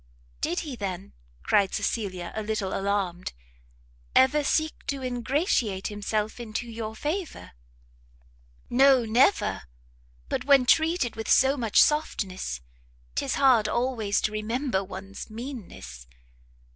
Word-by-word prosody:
"Did 175 Hz, -, 0 dB
he, 285 Hz, -5 st, -6 dB
then," 185 Hz, -, -5 dB, 0.3 s
cried 200 Hz, -2 st, +2 dB
Cecilia 185 Hz, -6 st, -2 dB
a 220 Hz, -, -2 dB
little 210 Hz, -3 st, -2 dB
alarmed, 195 Hz, -3 st, -2 dB, 0.8 s
"ever 280 Hz, +3 st, +5 dB
seek 315 Hz, +2 st, +1 dB
to 275 Hz, -1 st, -3 dB
ingratiate 245 Hz, -, 0 dB
himself 210 Hz, +2 st, -2 dB
into 235 Hz, +1 st, -4 dB
your 225 Hz, -1 st, -6 dB
favour?" 325 Hz, -, -4 dB, 1.2 s
"No, 260 Hz, -1 st, +5 dB
never! 250 Hz, -, +3 dB, 0.7 s
but -, -, -2 dB
when 275 Hz, -2 st, +6 dB
treated 315 Hz, -3 st, +2 dB
with 225 Hz, -1 st, -5 dB
so 270 Hz, +1 st, +5 dB
much 230 Hz, -6 st, +2 dB
softness, 190 Hz, -, +1 dB, 0.5 s
'tis 270 Hz, -, -1 dB
hard 255 Hz, -6 st, +4 dB
always 235 Hz, -5 st, 0 dB
to 215 Hz, -, 0 dB
remember 220 Hz, 0 st, -1 dB
one's 195 Hz, +2 st, -8 dB
meanness! 215 Hz, -, -8 dB
225 Hz, 115 wpm, -26 LUFS, 200-265 Hz, 1.2 s, when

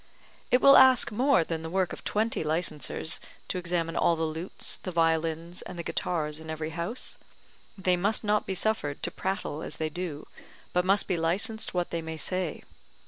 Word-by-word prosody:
It 250 Hz, -, +4 dB
will 275 Hz, 0 st, +9 dB
ask 260 Hz, -2 st, +7 dB
more 250 Hz, -3 st, +3 dB
than 160 Hz, 0 st, -4 dB
the 160 Hz, -, -5 dB
work 185 Hz, +1 st, 0 dB
of -, -, -9 dB
twenty 220 Hz, -3 st, 0 dB
licensers 160 Hz, 0 st, -2 dB, 0.3 s
to 185 Hz, -, -1 dB
examine 170 Hz, -1 st, -2 dB
all 170 Hz, -, +3 dB
the 165 Hz, -, -2 dB
lutes, 160 Hz, +3 st, -1 dB
the -, -, -6 dB
violins, 165 Hz, +1 st, 0 dB
and -, -, -8 dB
the 170 Hz, -, -4 dB
guitars 155 Hz, -3 st, -2 dB
in 160 Hz, 0 st, -10 dB
every 155 Hz, 0 st, -4 dB
house; 170 Hz, +9 st, -3 dB, 0.6 s
they 185 Hz, -1 st, +2 dB
must 200 Hz, +6 st, +1 dB
not 210 Hz, 0 st, +1 dB
be 190 Hz, -, -1 dB
suffered 180 Hz, -9 st, 0 dB
to -, -, 0 dB
prattle 190 Hz, -5 st, -3 dB
as -, -, -6 dB
they 155 Hz, -1 st, -1 dB
do, 165 Hz, -3 st, -5 dB, 0.5 s
but 180 Hz, 0 st, +2 dB
must 195 Hz, +2 st, +3 dB
be 185 Hz, -, 0 dB
licensed 185 Hz, +7 st, 0 dB
what 175 Hz, -1 st, -1 dB
they 170 Hz, -, -2 dB
may 160 Hz, 0 st, -6 dB
say. 185 Hz, +1 st, -2 dB
175 Hz, 190 wpm, -28 LUFS, 160-195 Hz, 0.6 s, will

